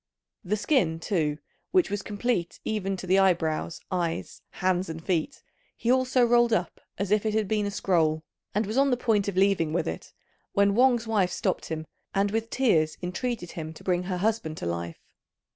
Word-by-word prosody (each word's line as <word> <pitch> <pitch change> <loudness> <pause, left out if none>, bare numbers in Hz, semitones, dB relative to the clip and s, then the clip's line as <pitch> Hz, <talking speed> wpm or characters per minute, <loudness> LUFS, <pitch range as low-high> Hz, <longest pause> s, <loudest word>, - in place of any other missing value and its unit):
The 210 +2 0
skin, 200 - +1
too, 160 -5 0 0.3
which 365 - +2
was 205 -1 -1
complete 205 -3 -2
even 195 -3 -1
to 185 - -7
the 190 +2 +4
eyebrows, 170 -3 +1
eyes, 170 -3 -2
hands, 185 0 0
and 160 0 -7
feet, 170 -5 -1 0.3
he 235 - +1
also 255 -1 +3
rolled 240 0 +4
up - - -1 0.2
as 200 0 -2
if 210 -1 +3
it 215 -1 0
had 215 -2 +1
been 210 -1 0
a - - -1
scroll, 160 -5 +1 0.3
and 210 +1 +2
was 215 +5 -3
on 275 0 +4
the 250 - +2
point 215 -5 +1
of 195 -2 -3
leaving 190 -5 +3
with 175 - 0
it, 80 0 -5 0.4
when 200 0 +4
Wang's 240 0 +4
wife 205 -5 +1
stopped - - -1
him, 160 -1 -4 0.3
and 200 +1 +2
with 225 +1 -1
tears 165 -13 +2
entreated 185 +1 -3
him 160 -1 -6
to - - -14
bring 180 -1 +1
her 180 0 -3
husband 200 -5 -1
to - - -5
life. 85 0 -3
195 Hz, 195 wpm, -27 LUFS, 165-220 Hz, 0.4 s, the